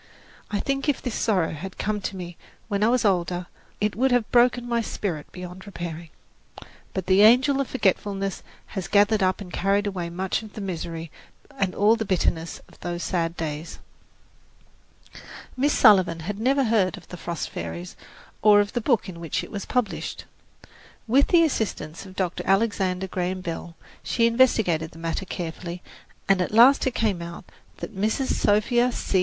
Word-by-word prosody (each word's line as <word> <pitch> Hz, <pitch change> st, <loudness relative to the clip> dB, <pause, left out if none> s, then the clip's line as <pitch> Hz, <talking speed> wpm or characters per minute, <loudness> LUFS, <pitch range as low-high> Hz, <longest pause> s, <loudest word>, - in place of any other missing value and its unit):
I 205 Hz, -, -1 dB
think 275 Hz, +1 st, -1 dB
if 285 Hz, -, +1 dB
this 245 Hz, -, -4 dB
sorrow 195 Hz, -9 st, +1 dB
had 180 Hz, +5 st, -7 dB
come 210 Hz, 0 st, -2 dB
to 195 Hz, -, -4 dB
me 175 Hz, -2 st, -7 dB, 0.3 s
when 200 Hz, -1 st, -1 dB
I -, -, +5 dB
was 245 Hz, -1 st, +2 dB
older, 180 Hz, -2 st, +1 dB, 0.3 s
it 210 Hz, 0 st, 0 dB
would 265 Hz, +4 st, +2 dB
have 245 Hz, -3 st, +1 dB
broken 245 Hz, 0 st, +4 dB
my 235 Hz, -1 st, +1 dB
spirit 175 Hz, -9 st, -4 dB
beyond 180 Hz, +2 st, -9 dB
repairing. 170 Hz, -3 st, -6 dB, 0.9 s
But 190 Hz, -2 st, -2 dB
the 190 Hz, +2 st, +4 dB
angel 260 Hz, +6 st, +6 dB
of 275 Hz, -, -2 dB
forgetfulness 195 Hz, -4 st, -1 dB, 0.3 s
has 190 Hz, -3 st, -3 dB
gathered 205 Hz, +1 st, +3 dB
up 185 Hz, +1 st, +1 dB
and 180 Hz, -3 st, -9 dB
carried 200 Hz, +2 st, +1 dB
away 185 Hz, -4 st, -3 dB
much 185 Hz, +4 st, -2 dB
of 215 Hz, -2 st, -11 dB
the -, -, -7 dB
misery 165 Hz, -3 st, -5 dB, 0.4 s
and 190 Hz, -2 st, -1 dB
all 210 Hz, +3 st, +4 dB
the 225 Hz, -, -2 dB
bitterness 170 Hz, -4 st, -1 dB
of -, -, -20 dB
those 175 Hz, 0 st, -4 dB
sad 170 Hz, -2 st, -1 dB
days. 155 Hz, 0 st, -5 dB, 1.8 s
Miss 280 Hz, +3 st, +2 dB
Sullivan 185 Hz, -, +5 dB
had 200 Hz, +5 st, -5 dB
never 270 Hz, +4 st, +2 dB
heard 210 Hz, -7 st, +2 dB
of -, -, -14 dB
"The -, -, -7 dB
Frost 170 Hz, -2 st, -4 dB
Fairies" 85 Hz, +1 st, -6 dB, 0.5 s
or 210 Hz, -1 st, +7 dB
of 205 Hz, 0 st, 0 dB
the 240 Hz, -, -1 dB
book 235 Hz, -2 st, +1 dB
in 175 Hz, -3 st, -8 dB
which 165 Hz, -2 st, -2 dB
it -, -, -10 dB
was 200 Hz, -2 st, -5 dB
published. 245 Hz, -5 st, -2 dB, 0.8 s
With 265 Hz, +5 st, +4 dB
the 340 Hz, -2 st, +5 dB
assistance 200 Hz, -, -2 dB
of 190 Hz, -, -13 dB
Dr. 185 Hz, -2 st, -2 dB
Alexander 195 Hz, -2 st, +1 dB
Graham 185 Hz, 0 st, -3 dB
Bell, 170 Hz, -1 st, -6 dB, 0.3 s
she 230 Hz, -, +1 dB
investigated 220 Hz, -9 st, +3 dB
the -, -, -13 dB
matter 165 Hz, +3 st, -3 dB
carefully, 175 Hz, 0 st, -6 dB, 0.4 s
and 195 Hz, -1 st, +3 dB
at 180 Hz, -, -1 dB
last 245 Hz, +6 st, +6 dB
it 255 Hz, -, -2 dB
came 205 Hz, -6 st, 0 dB
out 170 Hz, +1 st, -8 dB, 0.3 s
that 220 Hz, -, -7 dB
Mrs. 220 Hz, +7 st, 0 dB
Sophia 240 Hz, +4 st, +2 dB
C. 195 Hz, -, 0 dB
195 Hz, 175 wpm, -25 LUFS, 175-225 Hz, 1.8 s, or